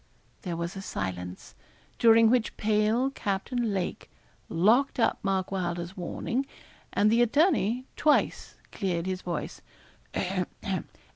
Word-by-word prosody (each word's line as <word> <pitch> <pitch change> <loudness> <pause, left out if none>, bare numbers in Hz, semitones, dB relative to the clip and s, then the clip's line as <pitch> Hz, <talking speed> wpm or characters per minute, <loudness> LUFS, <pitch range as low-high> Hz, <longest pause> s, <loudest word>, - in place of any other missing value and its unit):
There 175 -3 -4
was 170 +2 -4
a 195 - -5
silence, 90 - -5 0.5
during 225 -1 +6
which 245 -3 +1
pale 215 +5 +2
Captain 225 +1 -2
Lake 190 -3 -3 0.4
locked 225 +12 +3
up 230 - +2
Mark 190 -1 -1
Wylder's 175 -1 -3
warning, 235 +8 -3 0.4
and 210 +1 +3
the 230 +1 +4
attorney 255 - +2
twice 300 -1 +1 0.2
cleared 180 -4 -2
his 185 -1 -2
voice. 170 -3 -4
200 Hz, 115 wpm, -28 LUFS, 175-235 Hz, 0.5 s, during